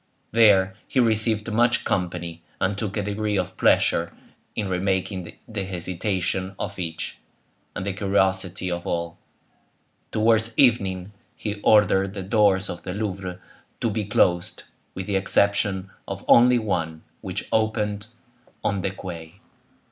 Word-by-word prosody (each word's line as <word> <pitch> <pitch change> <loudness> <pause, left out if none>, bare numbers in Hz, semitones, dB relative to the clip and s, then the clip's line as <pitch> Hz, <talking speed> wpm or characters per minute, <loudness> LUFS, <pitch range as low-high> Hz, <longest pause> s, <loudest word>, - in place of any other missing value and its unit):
There 100 -4 +5
he 130 - 0
received 110 -2 +2
much 120 +2 +3
company, 85 -2 -2 0.2
and 95 +2 +1
took 105 0 -3
a 105 - 0
degree 105 +1 -1
of 90 0 -2
pleasure 85 0 +3 0.4
in 105 - -1
remarking 95 -1 -1 0.2
the 105 -3 -4
hesitation 95 +1 -2
of 100 -1 -5
each, 80 -2 -4 0.6
and 90 - -4
the 100 - -1
curiosity 95 -2 0
of 85 0 -4
all. 85 0 -3 0.9
Towards 110 +1 +2
evening 100 -7 +3 0.2
he 105 -1 -5
ordered 100 -2 +4
the 95 - -4
doors 100 -1 +3
of 90 - -6
the 90 - -5
Louvre 95 -4 -4 0.4
to 115 - 0
be 105 +1 -1
closed, 90 -5 +1 0.3
with 95 - -4
the 100 -1 0
exception 100 0 +2 0.2
of - - -6
only 125 +1 +7
one, 85 -8 -2 0.2
which - - -4
opened 105 -1 0 0.6
on 100 -1 0
the 95 - 0
quay. 85 -3 -8
95 Hz, 135 wpm, -24 LUFS, 90-105 Hz, 0.9 s, only